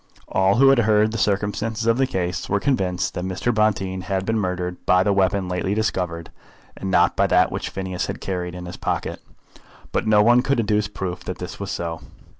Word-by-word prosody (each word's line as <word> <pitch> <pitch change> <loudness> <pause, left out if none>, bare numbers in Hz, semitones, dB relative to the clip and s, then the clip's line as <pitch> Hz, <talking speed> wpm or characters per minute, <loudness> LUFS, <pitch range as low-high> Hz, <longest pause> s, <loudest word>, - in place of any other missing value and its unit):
All 95 +1 +3
who 135 +4 +6
had 135 -2 +5
heard 110 -1 +3
the 115 - -3
circumstances 105 +3 -1
of 115 +2 +2
the 135 - +3
case 90 -5 -3
were 100 - +2
convinced 95 -9 0
that 90 - -4
Mr. 95 +6 -1
Bonteen 95 -3 0
had 95 0 -2
been 110 +1 0
murdered 90 -2 -3
by 90 0 +5
the 100 0 +2
weapon 95 0 +1
lately 90 +2 -1
discovered, 90 -6 -2 0.4
and 95 - -5
not 95 - +3
by - - +3
that - - +3
which - - -3
Phineas 95 -1 -4
had - - -5
carried 90 -2 -4
in 90 0 -7
his 90 - -8
pocket, - - -3 0.7
but - - -1
no 105 -1 +5
one 120 +2 +5
could 135 0 0
adduce 105 -1 +1
proof 90 -3 -5
that 90 - -5
it 90 +1 -7
was 100 -1 -5
so. 85 -3 -4
95 Hz, 210 wpm, -22 LUFS, 90-110 Hz, 0.7 s, who